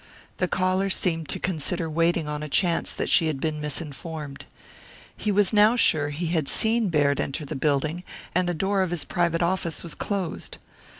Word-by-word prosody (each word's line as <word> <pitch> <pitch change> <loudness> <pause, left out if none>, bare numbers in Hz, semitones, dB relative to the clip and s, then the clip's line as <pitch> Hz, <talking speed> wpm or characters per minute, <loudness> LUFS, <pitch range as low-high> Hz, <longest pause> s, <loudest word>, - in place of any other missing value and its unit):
The 185 - +1
caller 185 +2 +1
seemed 165 -4 0
to - - -2
consider 170 -1 -2
waiting 165 0 +1
on 150 0 -3
a 150 - -5
chance 170 +3 +1
that - - -3
she 165 - +4
had 150 -4 -2
been 155 0 -2
misinformed. 150 0 -6 0.7
He 210 - -1
was 205 +1 +3
now 210 +3 +6
sure 155 -11 +3
he 150 +4 -3
had 160 -3 0
seen 225 -1 +2
Baird 145 -3 +2
enter 145 +3 -2
the 150 - -5
building, 150 +4 0 0.3
and 180 0 +1
the 175 - -1
door 195 +4 +1
of 185 - 0
his 175 -2 -1
private 170 -1 0
office 170 -2 -1
was 170 - -3
closed. 195 -5 -3
165 Hz, 185 wpm, -25 LUFS, 150-185 Hz, 0.7 s, now